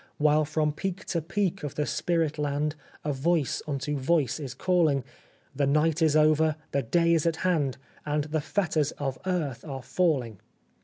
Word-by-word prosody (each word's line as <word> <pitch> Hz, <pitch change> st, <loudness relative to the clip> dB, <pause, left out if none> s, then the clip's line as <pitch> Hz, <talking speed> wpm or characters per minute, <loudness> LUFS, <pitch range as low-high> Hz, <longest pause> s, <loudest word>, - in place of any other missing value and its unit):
While 150 Hz, 0 st, +3 dB
from 155 Hz, 0 st, 0 dB
peak 195 Hz, +5 st, -4 dB
to 170 Hz, -3 st, -1 dB
peak 195 Hz, +3 st, -1 dB
of 145 Hz, -, -5 dB
the 150 Hz, -, 0 dB
spirit 165 Hz, -3 st, 0 dB
land 150 Hz, +1 st, -1 dB, 0.3 s
A 150 Hz, -, 0 dB
voice 150 Hz, +1 st, 0 dB
unto 145 Hz, 0 st, -2 dB
voice 145 Hz, -1 st, +1 dB
is 135 Hz, -4 st, -6 dB
calling: 160 Hz, -4 st, +2 dB, 0.3 s
' -, -, -34 dB
The 140 Hz, -1 st, +1 dB
night 155 Hz, +3 st, +2 dB
is 155 Hz, -2 st, +4 dB
over, 155 Hz, 0 st, +4 dB, 0.2 s
the 140 Hz, -, +1 dB
day 170 Hz, +7 st, +2 dB
is 165 Hz, 0 st, +2 dB
at 165 Hz, -, +1 dB
hand, 150 Hz, -8 st, +1 dB, 0.3 s
And 150 Hz, 0 st, 0 dB
the 155 Hz, +1 st, -2 dB
fetters 155 Hz, -3 st, 0 dB
of 135 Hz, -2 st, -4 dB
earth 160 Hz, -9 st, -1 dB
are 135 Hz, -4 st, -6 dB
falling 135 Hz, -, 0 dB
150 Hz, 175 wpm, -27 LUFS, 140-165 Hz, 0.3 s, is